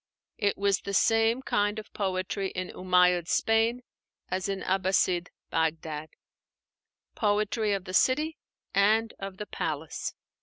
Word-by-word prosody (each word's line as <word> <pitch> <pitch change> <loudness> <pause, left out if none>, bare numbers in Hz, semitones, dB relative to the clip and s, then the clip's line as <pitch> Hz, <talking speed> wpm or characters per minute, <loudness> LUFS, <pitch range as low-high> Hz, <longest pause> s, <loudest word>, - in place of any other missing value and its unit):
It 205 -2 +1
was 200 -1 +2
the 200 - -4
same 225 +4 +3
kind 205 -2 +1
of 215 - -8
poetry 190 0 -2
in 185 -1 -4
Umáyyid 180 -2 +3
Spain 225 +5 +2 0.5
as 185 +2 -2
in 195 -1 -2
Abbasside 185 -2 +1 0.2
Bagdad: 155 -1 -1 1.0
poetry 210 0 +1
of 195 -1 -3
the 185 - -7
city 305 - +2 0.3
and 220 +3 +3
of 195 -1 -6
the 210 - -5
palace. 155 -5 -4
195 Hz, 125 wpm, -28 LUFS, 185-220 Hz, 1.0 s, same